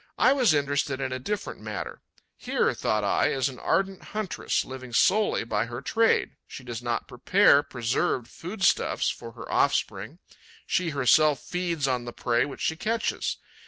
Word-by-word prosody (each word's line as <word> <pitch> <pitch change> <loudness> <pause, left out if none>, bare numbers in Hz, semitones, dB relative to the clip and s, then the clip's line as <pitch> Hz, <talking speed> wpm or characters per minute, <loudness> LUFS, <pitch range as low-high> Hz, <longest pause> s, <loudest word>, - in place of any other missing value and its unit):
I - - +5
was 255 -8 +3
interested 140 -1 0
in 135 -1 -2
a 130 - -3
different 205 - -4
matter. 105 -2 -6 0.3
Here, - - 0
thought 105 -1 0
I, 100 - +2
is 135 -1 0
an 130 - -10
ardent 195 -1 0
huntress, 215 -4 -2
living 130 -2 -9
solely 210 - +3
by 110 0 -1
her 120 +1 -6
trade. 225 - +1
She 130 - -9
does 120 -2 -6
not 120 -1 -2
prepare 145 +4 +4
preserved 120 -2 -1
foodstuffs 190 +4 0
for - - -9
her - - -9
offspring; - - 0 0.5
she 180 -2 0
herself 145 0 +4
feeds 170 -5 -2
on 125 -2 -1
the 120 - -7
prey 120 +1 +1
which 140 - -8
she 160 - 0
catches. 220 +6 -1
140 Hz, 160 wpm, -26 LUFS, 120-180 Hz, 0.5 s, I